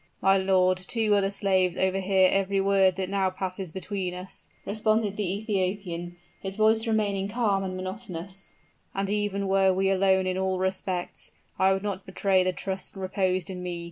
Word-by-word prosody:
"My 195 0 +4
lord, 185 -1 +3
two 215 +3 0
other 200 -1 +3
slaves 190 -3 +1
overhear 190 0 +3
every 195 0 +1
word 195 -1 +3
that 190 0 -2
now 195 -1 +1
passes 185 -1 -5
between 190 0 -4
us," 180 +1 -10 0.2
responded 215 -1 0
the 205 -4 -1
Ethiopian, 190 -4 -2 0.3
his 195 0 -5
voice 220 +2 +3
remaining 205 -3 0
calm 205 -4 +1
and 185 -1 -4
monotonous; 185 -1 -7 0.4
"and 195 0 -1
even 205 -1 -1
were 190 0 +4
we 190 +1 +1
alone 190 0 +3
in 185 0 -1
all 190 0 0
respects, 185 -1 -3 0.3
I 190 0 +5
would 195 0 0
not 200 -2 -4
betray 190 0 +2
the 185 - +1
trust 190 +1 -5
reposed 185 -1 -1
in 180 -1 -6
me. 175 -1 -4
190 Hz, 170 wpm, -27 LUFS, 185-200 Hz, 0.4 s, I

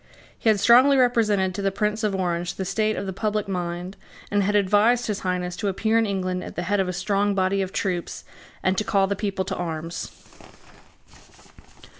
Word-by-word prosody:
He 225 - 0
had 210 -2 +3
strongly 255 +6 +6
represented 215 -7 +2
to 200 - -4
the 195 - +1
Prince 210 +2 -2
of 205 -2 0
Orange 175 -2 -2
the 190 - -4
state 215 +3 0
of 200 - -4
the 190 - -4
public 210 +1 -2
mind, 180 0 -4 0.3
and 205 0 +2
had 205 +1 0
advised 210 +5 +3
his 210 -2 -2
Highness 180 -1 -2
to 205 - -2
appear 220 +4 +1
in 225 - +1
England 185 -2 -2
at - - -9
the 175 - -3
head 205 +3 0
of 190 -1 0
a - - 0
strong 200 +2 0
body 190 +1 +1
of 190 -1 -3
troops, 180 -4 -3 0.4
and 185 0 +2
to - - -1
call 195 +1 +2
the 200 +1 -1
people 195 -2 -2
to 190 0 -3
arms. 165 -1 -5
195 Hz, 200 wpm, -24 LUFS, 185-210 Hz, 0.4 s, strongly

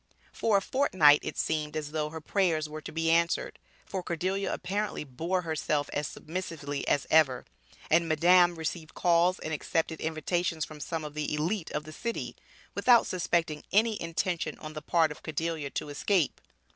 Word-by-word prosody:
For 215 -3 +2
a 195 - -1
fortnight 175 - +5
it - - -5
seemed 155 -1 -1
as 150 -1 -4
though 150 -1 -1
her 160 +1 -7
prayers 160 -2 +1
were 155 +1 -7
to - - -8
be 165 0 +1
answered, 170 +1 +1 0.3
for 190 - -4
Cordelia 185 +3 -2
apparently 200 +2 -2
bore 165 +7 -2
herself 155 -2 -1
as 145 -1 -1
submissively 155 -4 -5
as 145 - +2
ever, 140 -6 +4 0.4
and 165 +1 +3
Madame 175 +2 +5
received 160 0 -5
calls 175 +1 +3
and 160 - -5
accepted 160 +1 -1
invitations 160 +1 -1
from 155 -1 -11
some 160 +2 -4
of 150 - -7
the 150 -1 -3
elite 165 +4 -1
of 150 - -3
the 155 +1 -10
city, 235 +7 -4 0.4
without 240 -2 +5
suspecting 170 -4 -1
any 220 +1 +3
intention 165 -1 -2
on 155 0 -8
the 155 - -6
part 160 0 +2
of 150 - -9
Cordelia 160 -1 -3
to 145 - -4
escape. 165 +3 0
160 Hz, 170 wpm, -29 LUFS, 150-180 Hz, 0.4 s, fortnight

